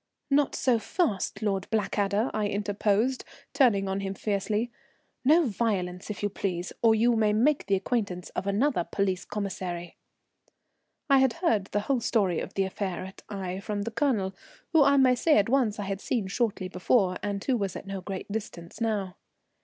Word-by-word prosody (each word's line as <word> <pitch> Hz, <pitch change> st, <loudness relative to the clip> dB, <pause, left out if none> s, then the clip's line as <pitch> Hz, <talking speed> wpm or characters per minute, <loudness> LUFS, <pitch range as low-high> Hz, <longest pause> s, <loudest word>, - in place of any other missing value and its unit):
"Not 285 Hz, 0 st, +3 dB
so 245 Hz, -3 st, +2 dB
fast, 215 Hz, -, -1 dB
Lord 195 Hz, -2 st, 0 dB
Blackadder," 210 Hz, +1 st, 0 dB
I 210 Hz, -1 st, 0 dB
interposed, 205 Hz, +4 st, 0 dB, 0.3 s
turning 205 Hz, -8 st, +3 dB
on 190 Hz, +1 st, -1 dB
him 195 Hz, 0 st, -3 dB
fiercely. 210 Hz, +3 st, -1 dB, 0.5 s
"No 315 Hz, +5 st, +5 dB
violence, 195 Hz, -5 st, -2 dB
if 210 Hz, -, -5 dB
you -, -, +3 dB
please, 180 Hz, -3 st, -3 dB
or 225 Hz, -1 st, +5 dB
you 235 Hz, +2 st, +3 dB
may 215 Hz, -2 st, +3 dB
make 270 Hz, +7 st, +2 dB
the 200 Hz, -, +3 dB
acquaintance 190 Hz, -3 st, -2 dB
of 195 Hz, -, -4 dB
another 205 Hz, 0 st, +2 dB
police 190 Hz, 0 st, -1 dB
commissary." 185 Hz, -4 st, -5 dB, 1.1 s
I 275 Hz, -2 st, +6 dB
had 265 Hz, -2 st, +3 dB
heard 230 Hz, -, +1 dB
the 205 Hz, +1 st, -1 dB
whole 260 Hz, +4 st, 0 dB
story 205 Hz, -7 st, +1 dB
of -, -, -6 dB
the 195 Hz, -, +2 dB
affair 190 Hz, -1 st, -3 dB
at 190 Hz, -, -11 dB
Aix 190 Hz, -1 st, -4 dB
from 205 Hz, -1 st, -2 dB
the 230 Hz, -, -4 dB
Colonel, 220 Hz, -7 st, 0 dB, 0.4 s
who 320 Hz, -3 st, +6 dB
I 280 Hz, 0 st, +4 dB
may 260 Hz, -2 st, +6 dB
say 300 Hz, +6 st, +3 dB
at 205 Hz, +1 st, +3 dB
once 245 Hz, -5 st, +2 dB
I 205 Hz, -, -3 dB
had 195 Hz, 0 st, -4 dB
seen 230 Hz, -6 st, -1 dB
shortly 200 Hz, -1 st, -1 dB
before, 185 Hz, +1 st, +1 dB
and 200 Hz, -1 st, -3 dB
who 265 Hz, -, +1 dB
was 200 Hz, -5 st, -2 dB
at -, -, -7 dB
no 195 Hz, -1 st, -5 dB
great 195 Hz, +1 st, -6 dB
distance 205 Hz, -2 st, -6 dB
now. 205 Hz, -5 st, -1 dB
205 Hz, 180 wpm, -28 LUFS, 195-235 Hz, 1.1 s, I